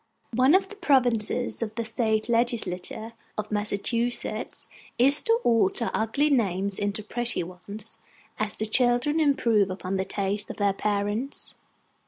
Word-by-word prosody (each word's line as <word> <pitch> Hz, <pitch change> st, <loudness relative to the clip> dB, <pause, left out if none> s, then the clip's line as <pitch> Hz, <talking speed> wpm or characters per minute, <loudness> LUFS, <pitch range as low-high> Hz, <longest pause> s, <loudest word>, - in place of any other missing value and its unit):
One 260 Hz, +7 st, +5 dB
of 385 Hz, 0 st, +2 dB
the 420 Hz, -, -10 dB
provinces 245 Hz, -, +1 dB
of 220 Hz, -1 st, -3 dB
the 230 Hz, -, -2 dB
state 220 Hz, -1 st, 0 dB
legislature 230 Hz, -2 st, -1 dB, 0.2 s
of 215 Hz, 0 st, -4 dB
Massachusetts 215 Hz, +3 st, -1 dB, 0.3 s
is 275 Hz, +4 st, +6 dB
to 455 Hz, 0 st, +2 dB
alter 230 Hz, 0 st, +2 dB
ugly 280 Hz, +7 st, +1 dB
names 200 Hz, -6 st, +1 dB
into 205 Hz, +1 st, -2 dB
pretty 240 Hz, -2 st, -1 dB
ones, 195 Hz, +5 st, -2 dB, 0.4 s
as 215 Hz, -1 st, -2 dB
the 215 Hz, -, -2 dB
children 245 Hz, +6 st, +2 dB
improve 235 Hz, -9 st, +3 dB
upon 185 Hz, +1 st, -3 dB
the 190 Hz, -, -1 dB
tastes 200 Hz, +1 st, -2 dB
of -, -, -7 dB
their 200 Hz, -1 st, +2 dB
parents. 205 Hz, +6 st, -2 dB
220 Hz, 140 wpm, -26 LUFS, 205-245 Hz, 0.4 s, is